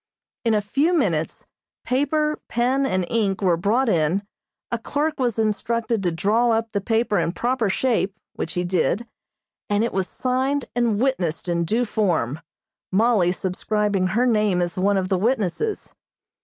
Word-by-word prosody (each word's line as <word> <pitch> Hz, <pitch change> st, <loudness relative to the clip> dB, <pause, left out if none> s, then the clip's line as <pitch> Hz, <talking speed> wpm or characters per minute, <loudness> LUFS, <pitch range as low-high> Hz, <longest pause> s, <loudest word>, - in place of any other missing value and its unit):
In 225 Hz, -2 st, +2 dB
a 210 Hz, -, +2 dB
few 295 Hz, -, +1 dB
minutes 165 Hz, -, -1 dB, 0.4 s
paper, 300 Hz, +4 st, 0 dB
pen 260 Hz, +3 st, +1 dB
and 185 Hz, -6 st, 0 dB
ink 205 Hz, -3 st, 0 dB
were 180 Hz, -3 st, +4 dB
brought 220 Hz, +10 st, +1 dB
in, 175 Hz, 0 st, +1 dB, 0.5 s
a 235 Hz, -, -1 dB
clerk 300 Hz, +6 st, -2 dB
was 240 Hz, -4 st, 0 dB
instructed 225 Hz, +1 st, 0 dB
to 180 Hz, -2 st, 0 dB
draw 210 Hz, +8 st, +2 dB
up 225 Hz, 0 st, 0 dB
the 200 Hz, -, -1 dB
paper 225 Hz, +1 st, +1 dB
in 165 Hz, -, 0 dB
proper 240 Hz, +2 st, 0 dB
shape, 205 Hz, -2 st, 0 dB, 0.2 s
which 165 Hz, -, -4 dB
he 180 Hz, -1 st, -1 dB
did, 180 Hz, -, 0 dB, 0.6 s
and 205 Hz, +1 st, +2 dB
it 235 Hz, -, -1 dB
was 190 Hz, -1 st, 0 dB
signed 260 Hz, +2 st, -1 dB
and 235 Hz, -4 st, +1 dB
witnessed 190 Hz, -12 st, 0 dB
in 170 Hz, -1 st, 0 dB
due 230 Hz, +8 st, +1 dB
form, 170 Hz, -, 0 dB, 0.5 s
Mollie 205 Hz, -3 st, +3 dB
subscribing 195 Hz, +1 st, 0 dB
her 225 Hz, +7 st, +1 dB
name 210 Hz, -6 st, +2 dB
as 175 Hz, -1 st, -1 dB
one 195 Hz, +2 st, +2 dB
of 185 Hz, -1 st, 0 dB
the 190 Hz, -2 st, +1 dB
witnesses. 235 Hz, -, -1 dB
215 Hz, 160 wpm, -23 LUFS, 185-245 Hz, 0.6 s, were